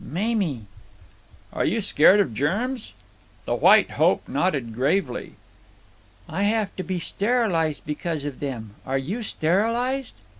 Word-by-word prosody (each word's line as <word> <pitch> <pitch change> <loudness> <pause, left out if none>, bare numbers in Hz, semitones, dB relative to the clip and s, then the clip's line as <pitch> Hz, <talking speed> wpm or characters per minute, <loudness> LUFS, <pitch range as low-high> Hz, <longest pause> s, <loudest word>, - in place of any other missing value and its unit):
"Mamie." 185 - -1 0.9
"Are - - -1
you 225 - +1
scared 195 -1 +5
of 145 - +1
germs?" 215 - -2 0.5
The - - -1
White - - +5
Hope - - +2
nodded 140 -11 -1
gravely. 130 - -1 0.9
"I 165 +6 -3
have 210 0 0
to 185 - -3
be 185 -1 -3
sterilized 185 -5 0
because 150 0 -3
of 145 -3 -5
them. 115 -7 -5
Are 135 +1 -1
you 180 - -3
sterilized?" 230 +8 0
185 Hz, 125 wpm, -24 LUFS, 145-220 Hz, 0.9 s, scared